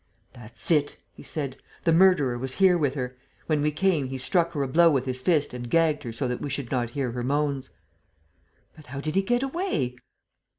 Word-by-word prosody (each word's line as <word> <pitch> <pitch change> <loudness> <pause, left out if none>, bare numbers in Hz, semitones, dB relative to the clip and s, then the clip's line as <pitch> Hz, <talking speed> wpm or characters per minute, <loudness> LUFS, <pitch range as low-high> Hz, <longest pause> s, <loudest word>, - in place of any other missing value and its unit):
"That's 120 +4 -7
it," 150 -3 +2 0.2
he - - -13
said. 140 -4 -5 0.3
"The 165 - +3
murderer 165 -8 +4
was 130 +2 -5
here 190 -2 +5
with 145 -5 0
her. 125 -2 -4 0.3
When 155 -2 +1
we 150 - +2
came, 155 -3 +1
he 135 0 -5
struck 170 +6 +1
her 145 -3 -1
a - - -1
blow 170 +5 +5
with 135 -5 +1
his 130 -1 -4
fist 150 -2 +1
and 120 -1 -6
gagged 160 -1 +2
her 120 - -6
so 125 +4 -2
that 125 0 -3
we 145 - -3
should 140 -2 -4
not 120 -3 0
hear 130 -4 -1
her 120 +1 -4
moans." 140 0 -1 1.1
"But 155 -2 -15
how 135 +2 -6
did 155 +2 -3
he 195 - +3
get 245 +6 0
away?" 235 - -2
145 Hz, 215 wpm, -26 LUFS, 130-165 Hz, 1.1 s, here